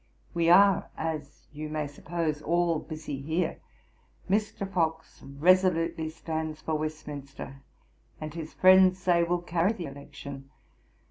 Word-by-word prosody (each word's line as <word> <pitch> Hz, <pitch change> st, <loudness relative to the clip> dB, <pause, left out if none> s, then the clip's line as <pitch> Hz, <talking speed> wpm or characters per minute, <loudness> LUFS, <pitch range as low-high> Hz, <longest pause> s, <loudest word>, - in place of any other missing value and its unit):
'We 170 Hz, -1 st, +2 dB
are, 195 Hz, +2 st, +6 dB
as 155 Hz, -3 st, -5 dB
you 155 Hz, 0 st, -6 dB
may 155 Hz, -1 st, -2 dB
suppose, 155 Hz, +1 st, -3 dB
all 170 Hz, 0 st, +1 dB
busy 155 Hz, -3 st, -6 dB
here. 160 Hz, +5 st, -1 dB, 0.7 s
Mr. 205 Hz, 0 st, 0 dB
Fox 160 Hz, -4 st, -2 dB
resolutely 165 Hz, +2 st, +2 dB
stands 160 Hz, -1 st, -4 dB
for 160 Hz, -, -3 dB
Westminster, 145 Hz, -3 st, -5 dB, 0.6 s
and 155 Hz, -1 st, -6 dB
his 160 Hz, -2 st, -6 dB
friends 185 Hz, 0 st, +6 dB
say 175 Hz, -2 st, +2 dB
will 175 Hz, +1 st, 0 dB
carry 175 Hz, +5 st, +1 dB
the 180 Hz, -7 st, -6 dB
election. 140 Hz, -1 st, -9 dB
160 Hz, 125 wpm, -28 LUFS, 150-175 Hz, 0.7 s, are